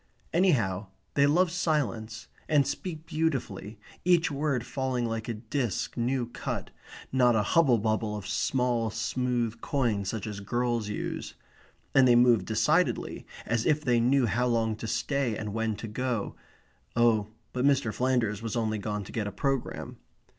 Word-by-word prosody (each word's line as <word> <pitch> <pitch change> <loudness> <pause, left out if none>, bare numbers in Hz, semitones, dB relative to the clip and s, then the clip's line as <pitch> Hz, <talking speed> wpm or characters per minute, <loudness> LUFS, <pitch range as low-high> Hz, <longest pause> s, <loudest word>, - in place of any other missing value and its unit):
Anyhow, 115 - +2 0.3
they 140 0 +4
love 170 +4 +3
silence, 140 -11 -1 0.2
and 145 -3 +4
speak 160 +2 -4
beautifully, 135 -11 -2 0.3
each 175 -2 +3
word 140 -4 -1
falling 130 -3 -1
like 115 0 -3
a 115 - -2
disc 115 0 -2
new 125 +1 0
cut, 120 - -5 0.4
not 125 -2 +4
a 105 - +3
hubble 135 +1 +4
bubble 110 0 0
of 100 - -7
small 120 +2 0
smooth 120 +1 -1
coins 115 -8 0
such 110 - -3
as 105 -2 -5
girls 120 +1 -1
use; 105 - -4 0.6
and 135 -1 +6
they 120 - +6
move 120 -5 +5
decidedly, 110 -1 +1 0.2
as 115 0 0
if 150 0 +2
they 120 -2 +3
knew 130 +2 +3
how 120 +4 +1
long 115 -2 +1
to 115 - -5
stay 135 0 0
and 105 -2 -4
when 110 -1 -1
to 115 - -7
go 120 0 -2 0.6
oh, 115 -3 +3 0.3
but 125 - -1
Mr. 135 -5 +3
Flanders 120 -3 0
was 115 0 -3
only 110 -2 0
gone 105 0 -3
to - - -10
get 110 -3 -2
a - - -4
programme. 135 +1 -2
120 Hz, 160 wpm, -28 LUFS, 110-135 Hz, 0.6 s, and